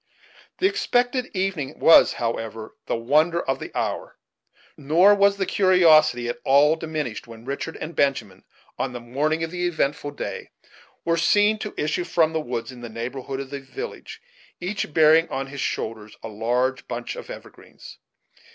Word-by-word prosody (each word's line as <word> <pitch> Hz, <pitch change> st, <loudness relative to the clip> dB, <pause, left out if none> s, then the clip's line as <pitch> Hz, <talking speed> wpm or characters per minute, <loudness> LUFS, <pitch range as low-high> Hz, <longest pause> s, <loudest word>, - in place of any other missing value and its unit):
The -, -, 0 dB
expected 255 Hz, -11 st, +1 dB
evening 185 Hz, -8 st, -2 dB
was, 165 Hz, -, +6 dB
however, 115 Hz, -1 st, -4 dB
the -, -, 0 dB
wonder 155 Hz, +9 st, +2 dB
of 135 Hz, -5 st, -2 dB
the -, -, -7 dB
hour; -, -, -3 dB, 0.6 s
nor 165 Hz, +8 st, +4 dB
was 200 Hz, 0 st, +3 dB
the 195 Hz, -, 0 dB
curiosity 155 Hz, -11 st, +4 dB
at 120 Hz, -, -4 dB
all 145 Hz, +3 st, +5 dB
diminished 155 Hz, -9 st, -5 dB
when 115 Hz, 0 st, -12 dB
Richard 140 Hz, +4 st, -4 dB
and 165 Hz, +2 st, -7 dB
Benjamin, 140 Hz, -1 st, -1 dB, 0.4 s
on 125 Hz, -, -2 dB
the 125 Hz, -, -5 dB
morning 145 Hz, +7 st, -1 dB
of 165 Hz, -, -4 dB
the 180 Hz, 0 st, -1 dB
eventful 150 Hz, -3 st, -1 dB
day, 145 Hz, -, -6 dB, 0.6 s
were 165 Hz, 0 st, +1 dB
seen 205 Hz, +5 st, +3 dB
to 215 Hz, -, -6 dB
issue 155 Hz, +4 st, -1 dB
from 160 Hz, -2 st, +1 dB
the 160 Hz, -, 0 dB
woods 120 Hz, -2 st, -5 dB
in 125 Hz, -1 st, -12 dB
the 120 Hz, -, -7 dB
neighborhood 125 Hz, +4 st, -5 dB
of 135 Hz, -1 st, -7 dB
the 140 Hz, -, -4 dB
village, 445 Hz, -, -8 dB, 0.4 s
each 185 Hz, -1 st, -3 dB
bearing 160 Hz, +2 st, +5 dB
on 135 Hz, 0 st, -3 dB
his 135 Hz, 0 st, -7 dB
shoulders 110 Hz, -1 st, -4 dB
a 115 Hz, -, -5 dB
large 120 Hz, +5 st, -1 dB
bunch 120 Hz, 0 st, -5 dB
of -, -, -9 dB
evergreens. -, -, -12 dB
150 Hz, 165 wpm, -23 LUFS, 125-175 Hz, 0.6 s, was